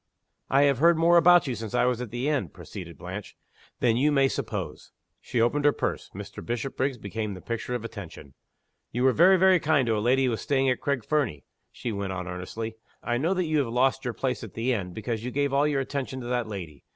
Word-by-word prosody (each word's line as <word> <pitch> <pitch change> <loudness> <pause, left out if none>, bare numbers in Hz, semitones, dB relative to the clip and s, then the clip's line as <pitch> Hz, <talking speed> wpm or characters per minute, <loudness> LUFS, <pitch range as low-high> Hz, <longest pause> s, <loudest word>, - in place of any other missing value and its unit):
"I 140 +1 +4
have 140 -3 +3
heard 170 +2 +5
more 170 +1 +4
about 175 +1 +7
you, 130 - -2
since 110 -1 -5
I 125 - +3
was 125 -1 0
at 125 - -5
the 120 +5 -3
inn," 140 - 0
proceeded - - -10
Blanche, - - -8 0.4
"than 115 -2 +3
you 145 +4 +3
may 135 -2 +4
suppose." 105 - -5 0.3
(She 120 - -3
opened 120 +6 +2
her 145 - +6
purse: - - -3
Mr. - - -8
Bishopriggs 130 +2 -2
became 105 -1 -4
the - - -9
picture 115 +4 -4
of 115 -2 -4
attention.) 85 -11 -9 0.6
"You 120 +2 -1
were 130 - +6
very, 185 +6 +6
very 185 0 +5
kind 150 -5 +2
to 115 -2 +1
a - - 0
lady 130 +5 +3
who 125 - +1
was 115 - -3
staying 135 -2 +2
at 125 - -2
Craig 140 -6 -1
Fernie," 140 - -1 0.3
she 120 - -5
went 100 -2 -3
on, 90 -1 -5
earnestly. 110 +5 -5 0.3
"I 120 0 0
know 170 +7 +1
that 185 -1 0
you 155 -1 +1
have 135 - +1
lost 130 +2 +2
your 125 -3 -3
place 125 -4 -2
at 110 - -9
the 120 +3 0
inn, 95 -5 -3
because 110 +3 -4
you 125 - -3
gave 140 +1 0
all 140 +2 +3
your 140 -2 +1
attention 135 -1 -4
to - - -7
that 120 -2 0
lady. 85 -9 -7
125 Hz, 235 wpm, -27 LUFS, 110-140 Hz, 0.6 s, about